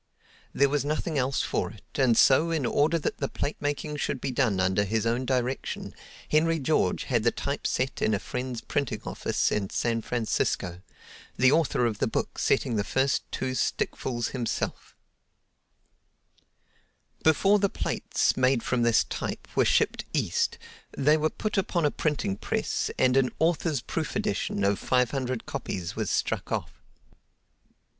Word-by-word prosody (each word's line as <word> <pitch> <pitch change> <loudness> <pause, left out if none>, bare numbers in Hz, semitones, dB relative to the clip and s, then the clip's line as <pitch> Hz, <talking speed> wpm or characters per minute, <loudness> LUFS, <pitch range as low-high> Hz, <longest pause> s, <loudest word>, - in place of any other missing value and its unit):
There 140 - +3
was 140 -1 0
nothing 155 +1 -1
else 130 +1 0
for - - -1
it, - - -14
and 125 -4 +3
so 155 +5 +5
in 160 -5 0
order 150 +7 +2
that 155 - -3
the 140 - 0
plate 145 - -3
making 145 +1 -2
should 140 - -2
be 135 - -2
done 120 -7 +1
under 95 +2 +2
his 110 +2 -1
own 120 +3 0
direction 130 0 -2 0.3
Henry 165 +2 +3
George 155 +1 +1
had 120 -5 +1
the 120 - +4
type 140 +4 -3
set 130 +1 -1
in 110 - +2
a - - -2
friend's 125 +1 -4
printing 140 -4 -2
office - - -1
in 100 -2 -1
San 115 -1 0
Francisco, 110 -7 -1 0.6
the 130 +1 +5
author 155 -5 +2
of 110 -3 -1
the - - +2
book - - -3
setting 115 - +1
the 100 - +1
first 135 +5 +1
two 130 - -2
stickfuls 120 0 -1
himself. 120 -4 -3 2.3
Before 195 +6 +4
the 200 0 +2
plates, - - 0
made 130 -2 +2
from 125 -1 0
this 120 -1 +4
type, - - -5
were - - +4
shipped - - +2
East, - - 0 0.4
they 150 +3 +4
were 155 0 +1
put 210 +3 -2
upon 175 -3 0
a 145 - +3
printing 145 -10 -1
press - - -1
and 130 0 +3
an 135 -2 +4
"Author's 160 -4 +1
Proof - - -3
Edition" 100 - -1
of 100 0 +2
five 125 -1 +2
hundred 130 -3 -2
copies 90 -2 -4
was - - -2
struck - - -1
off. - - -2
130 Hz, 160 wpm, -27 LUFS, 120-150 Hz, 2.3 s, so